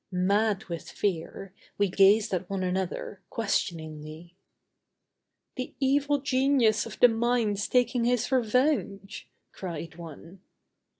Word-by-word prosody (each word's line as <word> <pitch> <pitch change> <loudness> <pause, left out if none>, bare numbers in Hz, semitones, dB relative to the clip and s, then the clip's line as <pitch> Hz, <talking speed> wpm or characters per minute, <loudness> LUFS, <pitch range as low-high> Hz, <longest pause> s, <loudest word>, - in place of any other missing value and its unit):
Mad 200 +3 +1
with 170 -2 -7
fear, 190 0 -3 0.2
we 205 - +2
gazed 195 +3 +4
at 185 0 -2
one 195 -1 -2
another, 185 +1 -3
questioningly. 160 -5 -4 1.2
"The 255 - -5
evil 285 +1 +2
genius 260 -5 +2
of - - -10
the 245 - +8
mine's 225 -3 0
taking 245 -1 +2
his 245 +1 0
revenge," 250 -5 0 0.2
cried 165 -3 -7
one. 170 +2 -11
205 Hz, 110 wpm, -27 LUFS, 180-245 Hz, 1.2 s, the